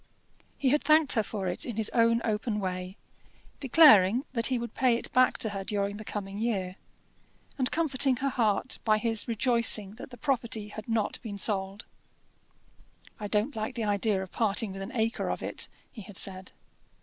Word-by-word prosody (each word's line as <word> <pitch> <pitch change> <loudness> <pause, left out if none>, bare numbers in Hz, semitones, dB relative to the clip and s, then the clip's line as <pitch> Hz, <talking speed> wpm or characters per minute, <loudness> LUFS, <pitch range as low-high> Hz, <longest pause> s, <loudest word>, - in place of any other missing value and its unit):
He 270 - +1
had 295 +3 +2
thanked 310 -2 +4
her 225 - +2
for 200 -2 -4
it 180 - -3
in 240 - -5
his 220 -1 0
own 230 0 +3
open 215 0 -1
way, 185 0 -4 0.6
declaring 255 - +6
that 230 -2 +1
he 255 - 0
would 235 0 -5
pay 255 -3 +2
it - - -5
back 255 0 +4
to 220 - -1
her 195 -1 -5
during 200 0 -2
the 215 - -8
coming 200 -1 -5
year, 195 -5 -2 0.8
and 255 0 +1
comforting 275 -5 +1
her 275 +3 -1
heart 230 -1 0
by 215 -1 +3
his 225 0 -1
rejoicing 230 -3 +2
that - - -9
the 245 - -12
property 235 -7 -1
had 215 +2 -9
not 225 -2 -1
been 210 -4 -6
sold. 195 0 0 1.3
"I 210 - -4
don't 215 +7 0
like 220 +3 -4
the 230 - -3
idea 205 -1 0
of 185 - -11
parting 215 -1 0
with 195 0 -7
an 195 +5 -6
acre 225 0 -1
of - - -3
it," - - -2 0.2
he 225 - -10
had 195 0 -7
said. 190 -1 -2
220 Hz, 185 wpm, -28 LUFS, 200-245 Hz, 1.3 s, declaring